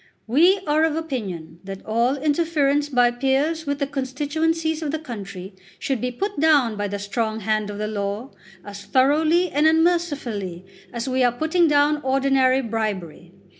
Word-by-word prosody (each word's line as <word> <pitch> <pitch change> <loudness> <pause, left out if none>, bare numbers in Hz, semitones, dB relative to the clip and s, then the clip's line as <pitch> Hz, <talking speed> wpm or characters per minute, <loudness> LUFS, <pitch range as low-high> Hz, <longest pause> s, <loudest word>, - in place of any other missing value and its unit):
We 345 - +4
are 305 +1 +2
of 320 -1 +1
opinion 195 - -5
that 195 0 -8
all 235 +4 +1
interference 295 -1 +1
by 245 -3 +3
peers 275 +6 0
with 285 0 -1
the 285 - -1
constituencies 310 +4 -2
of 310 - -3
the 315 - -1
country 200 - -8 0.2
should 265 -5 -2
be 250 - -1
put 385 - -4
down 285 -8 +3
by 205 0 -2
the 205 +1 -4
strong 220 +2 -3
hand 215 0 -1
of 205 - -6
the 210 - -2
law 205 +4 -4 0.3
as 200 -1 -9
thoroughly 310 - +2
and 295 +2 +3
unmercifully 290 - 0 0.3
as 235 +1 -4
we 260 0 +1
are 245 - +4
putting 320 +7 +1
down 295 0 +3
ordinary 265 -1 +2
bribery. 200 -7 -4
265 Hz, 165 wpm, -22 LUFS, 215-310 Hz, 0.3 s, We